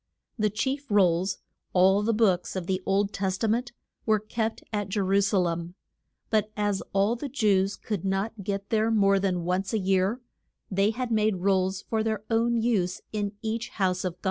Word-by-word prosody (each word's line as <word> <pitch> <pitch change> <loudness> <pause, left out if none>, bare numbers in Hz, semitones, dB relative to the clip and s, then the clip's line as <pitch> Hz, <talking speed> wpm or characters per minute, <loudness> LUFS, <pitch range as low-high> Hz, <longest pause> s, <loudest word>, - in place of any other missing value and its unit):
The 215 0 +3
chief 265 +7 -2
rolls, 185 -2 +3 0.4
all 190 +2 +5
the 220 +2 +1
books 205 -6 +1
of 185 -2 -3
the 185 +1 -1
Old 200 +1 +1
Tes 190 -1 -1
ta 225 - -1
ment, 240 +3 0 0.3
were 220 -1 +3
kept 220 +1 -3
at 205 -2 -2
Je 205 - -1
ru 195 +1 +3
sa 200 0 +1
lem, 170 -1 -1 0.6
but 215 -1 +2
as 205 -2 0
all 200 +4 +2
the 275 +4 -5
Jews 200 -6 +2
could 210 -6 -4
not 195 +2 -2
get 200 +1 -4
there 220 0 +2
more 200 -3 +4
than 185 -3 0
once 185 +4 -1
a - - +3
year, 195 +3 +1 0.5
they 195 +2 +3
had 240 +2 -3
made 215 -4 +1
rolls 190 -1 +1
for 220 -1 -1
their 220 -1 -1
own 235 +1 +2
use 205 -6 0
in 205 -1 -2
each 225 +1 -2
house 185 -2 +1
of 180 -2 -2
God. - - -43
200 Hz, 195 wpm, -27 LUFS, 190-220 Hz, 0.6 s, all